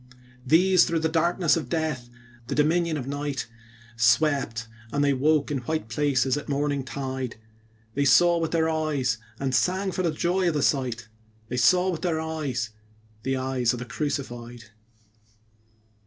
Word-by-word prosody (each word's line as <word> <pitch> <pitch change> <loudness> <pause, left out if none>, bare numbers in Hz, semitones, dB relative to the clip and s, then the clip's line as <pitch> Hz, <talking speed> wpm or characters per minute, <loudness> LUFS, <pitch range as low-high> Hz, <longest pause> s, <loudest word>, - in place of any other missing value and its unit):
These 180 +4 +5
through 165 -1 -1
the 160 - +1
darkness 170 +1 +2
of 155 -7 -4
death, 150 -7 -2 0.4
the - - -2
dominion 160 +2 +2
of 130 - -5
night, 140 -2 -3 0.5
Swept, 115 0 +2 0.2
and 145 0 +1
they 140 -1 +3
woke 150 +2 +2
in 140 - 0
white 125 -1 -3
places 135 +1 +1
at 145 - -6
morning 140 -1 0
tide: 130 -2 -4 0.6
They 140 +3 +1
saw 175 +4 +5
with 165 -1 -1
their 160 -1 +1
eyes, 150 -7 0 0.2
and 135 -1 -1
sang 185 +9 +1
for 185 -2 0
joy 175 +4 0
of 165 - +1
the 145 - +1
sight, 125 -5 0 0.4
They 125 - -3
saw 180 +9 +4
with 165 - -5
their 170 -3 0
eyes 145 -8 -3 0.5
the 135 +3 -1
Eyes 130 -2 0
of - - -4
the 125 - -6
Crucified. 120 -3 -5
145 Hz, 155 wpm, -26 LUFS, 125-160 Hz, 0.6 s, These